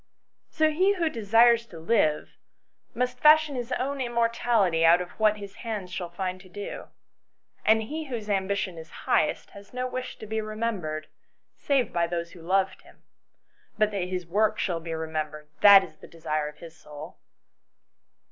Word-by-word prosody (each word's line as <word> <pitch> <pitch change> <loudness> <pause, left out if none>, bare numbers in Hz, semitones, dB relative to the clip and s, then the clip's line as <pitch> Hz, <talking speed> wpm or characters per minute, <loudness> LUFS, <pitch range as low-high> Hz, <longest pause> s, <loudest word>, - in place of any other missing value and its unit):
So 315 -1 +2
he 375 +6 +3
who 335 -4 0
desires 230 0 +4
to 170 - -12
live 160 -3 0 0.6
must 250 +1 -2
fashion 305 -1 +5
his 245 0 -5
own 275 +2 -2
immortality 230 -7 +1
out 165 +2 +6
of 180 0 -6
what 215 -1 +3
his 200 -1 -10
hands 210 -6 -5
shall 180 -2 -5
find 185 +1 -4
to 185 - -17
do. 205 +2 -7 0.8
And 220 +1 +4
he 310 +8 -5
whose 235 -6 -6
ambition 195 -3 -1
is 160 - -11 0.2
highest 155 - +1
has 200 +4 -14
no 250 0 -2
wish 255 0 -6
to - - -9
be 220 +1 -2
remembered, 215 -8 -3 0.5
save 270 -6 0
by 170 0 +1
those 170 0 -4
who 175 - -13
loved 190 +3 0
him; - - -21 0.7
but 215 -1 +2
that 195 -3 -2
his 180 -1 -4
work 215 +5 +1
shall 175 -4 -1
be 165 0 -5
remembered, 155 -1 -5
that 200 -1 +9
is 155 - -12
the - - -14
desire 155 -2 -3
of 150 - -10
his 165 -1 -12
soul." 150 -1 -11
200 Hz, 170 wpm, -26 LUFS, 170-235 Hz, 0.8 s, that